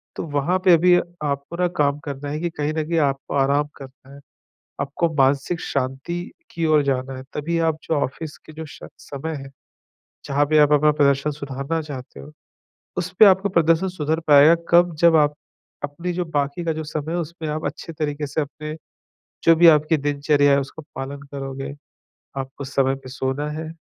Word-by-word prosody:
तो - - -4
वहाँ 145 +5 0
पे 180 -2 +8
भी 180 +2 +5 0.3
आपको 140 +2 -3
ना 180 0 +2
काम 145 -1 +2
करना 145 0 -5
है 150 +1 -3
कि 170 +1 -1
कहीं 150 -1 -3
न 155 0 -1
कहीं 165 0 +1
आपको 140 -2 -1
आराम 140 +2 +2
करना 135 0 -13
हैं। 140 - -12 0.6
आपको 165 +5 -1
मानसिक 140 +4 +2
शांति 135 +6 -3 0.3
की 165 -1 -2
ओर 155 -2 +4
जाना 135 -1 -1
हैं, 130 - -8
तभी 165 +3 -2
आप 160 -2 +1
जो - - -2
ऑफ़िस 145 +2 -3
के 155 - -12
जो 160 +1 -7
शक 145 - -11
समय 155 +3 -6
हैं, 135 -1 -9 0.7
जहाँ 145 +1 +1
पे 155 +1 +2
आप 150 0 +5
अपना 150 +1 +5
प्रदर्शन 140 0 +2
सुधारना 140 +2 -4
चाहते 130 - -9
हो 70 - -11 0.7
उसपे 180 +4 +4
आपको 195 0 +4
प्रदर्शन 165 +1 +3
सुधर 160 -3 -1
पाएगा, 150 +2 +8
कब? 175 -1 +4
जब 165 +1 +5
आप 150 -1 +4 0.5
अपनी 155 +5 -4
जो 180 0 -2
बाकी 145 +1 -2
का 165 - +1
जो 160 0 -4
समय 155 +1 -4
है, - - 0
उसमें 165 -1 -5
आप 155 +1 -3
अच्छे 150 +3 -5
तरीक़े 150 -1 -3
से 150 +3 -1
अपने 150 +1 -6 0.7
जो 165 - +7
भी 170 +1 +6
आपकी 155 +1 +5
दिनचर्या 145 0 +2
हैं, 140 - +4
उसका 140 +3 -8
पालन 135 +1 -6
करोगे। 135 0 -5 0.6
आपको 135 +1 -5
समय 135 0 +1
पे 130 - -9
सोना 135 +3 -2
हैं, 160 +1 -6
150 Hz, 190 wpm, -22 LUFS, 140-160 Hz, 0.7 s, पे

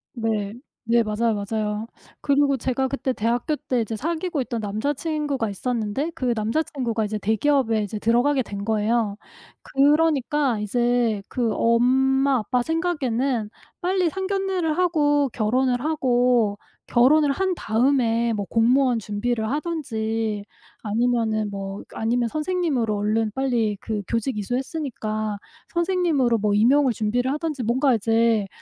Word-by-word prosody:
네. 215 -3 -2 0.3
네 235 +1 +3
맞아요, 225 +1 0
맞아요. 210 +1 -3 0.3
그리고 280 -1 +2
제가 260 +2 -1
그때 275 -1 -2
대학교 240 +7 0
때 270 -4 -2
이제 225 0 -3
사귀고 330 - -2
있던 240 -2 -3
남자 215 +8 -1
친구가 290 -6 -2
있었는데 235 - -2
그 255 -7 -1
남자 220 +8 0
친구가 235 -8 -2
이제 215 +1 -3
대기업에 225 +1 +1
이제 205 +1 -5
들어가게 245 +5 +2
된 200 -1 -6
거예요. 220 -1 +1 0.5
그러니까 290 -3 +2
이제 240 0 +1
그 235 -3 0
엄마, 265 +3 +3
아빠 245 +4 0
생각에는 270 -8 -1 0.3
빨리 365 -1 +1
상견례를 380 -3 -1
하고 290 -5 +2
결혼을 245 +3 +1
하고 245 -8 +2 0.3
결혼을 280 +4 +4
한 375 +3 0
다음에 235 -2 +1
뭐 205 -2 -2
공무원 245 +1 +3
준비를 220 +2 -2
하든지 225 -9 -2 0.4
아니면은 220 -1 0
뭐 195 0 -6
그 - - -16
아니면 235 +1 +1
선생님으로 305 - -1
얼른 215 +1 0
빨리 235 -6 0
그 215 -2 -3
교직 230 0 -1
이수했으니까 215 - -3 0.4
선생님으로 340 - +1
뭐 210 0 +1
임용을 255 +6 +4
준비를 240 +5 0
하든지 305 -4 -3
뭔가 255 +3 +2
이제 225 -1 +2
240 Hz, 310 characters per minute, -23 LUFS, 220-285 Hz, 0.5 s, 결혼을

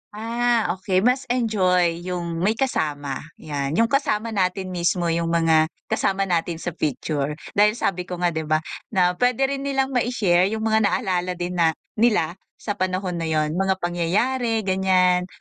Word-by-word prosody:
Ah, 235 +1 0
okey. 185 0 0
Mas 255 +2 +2
enjoy 185 -8 +1
yung 175 -2 -4
may 205 +6 +1
kasama. 145 - -2 0.2
Yan, 145 -1 -3
yung 230 +4 +2
kasama 230 -5 0
natin 185 -2 -1
mismo, 175 -1 0
yung 165 0 0
mga 165 -1 +3 0.2
kasama 195 0 +1
natin 170 -2 -1
sa 165 +2 -4
picture. 150 -1 -2 0.2
Dahil 210 +1 +3
sabi 180 -6 -2
ko 180 - -4
nga, 175 0 0
'di 160 -1 -4
ba, 155 +1 +1 0.2
na 180 -4 +2
pwede 250 +1 +2
rin 275 +1 -1
nilang 270 -1 0
mai-share 220 -8 +2
yung 220 +2 -3
mga 220 -1 +3
naalala 185 -4 -1
din 175 0 -4
na 160 -1 +3 0.2
nila 195 -7 +2 0.2
sa 210 - -5
panahon 185 -1 -1
na 165 - -2
yo'n, 155 -1 0
mga 190 +2 +1
pangyayari, 220 +7 0
ganyan, 185 -1 +2
185 Hz, 165 wpm, -23 LUFS, 170-220 Hz, 0.2 s, mga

